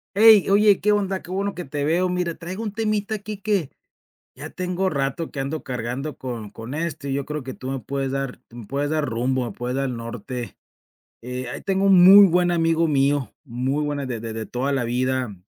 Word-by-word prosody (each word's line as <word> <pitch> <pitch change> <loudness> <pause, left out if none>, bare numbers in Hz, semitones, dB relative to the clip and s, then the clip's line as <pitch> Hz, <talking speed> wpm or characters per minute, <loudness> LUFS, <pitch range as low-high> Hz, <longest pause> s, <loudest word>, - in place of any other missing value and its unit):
Ey, 215 -2 +7
oye, 205 0 +5
qué 210 - +3
onda, 195 -2 0
qué - - -14
bueno 195 +2 -2
que 180 - -6
te 145 +1 -3
veo, 175 +4 +2
mira, 180 -1 -1
traigo 185 +7 -6
un 210 - -3
temita 215 -1 -1
aquí 210 0 -5
que, 200 -7 0 0.7
ya 145 +4 -7
tengo 185 +1 -1
rato 140 +1 -2
que 140 - -4
ando 140 +3 -4
cargando 125 +3 -4
con 120 -5 -6
con 115 +4 -9
esto 155 -3 -3
y - - -1
yo 140 0 -1
creo 150 -1 -4
que 130 0 -6
tú 130 - -8
me 135 - -3
puedes 135 +1 -3
dar 135 -2 -3
me 120 -1 -10
puedes 140 +6 -2
dar 155 -1 0
rumbo, 125 +1 0
me - - -5
puedes 125 +1 -4
dar 135 0 0
norte, 120 +1 -6 0.7
eh, 125 +1 -5
ahí - - -6
tengo 195 0 0
un 185 -2 +7
muy 200 +2 +10
buen 175 0 +2
amigo 165 -1 +2
mío, 140 -4 +1
muy 135 +2 -2
buena 145 -2 -2
de 120 -3 -4
de 115 0 -5
de 110 0 -5
toda 130 +3 -2
la 135 -3 0
vida, 125 -1 -1
145 Hz, 215 wpm, -23 LUFS, 130-180 Hz, 0.7 s, muy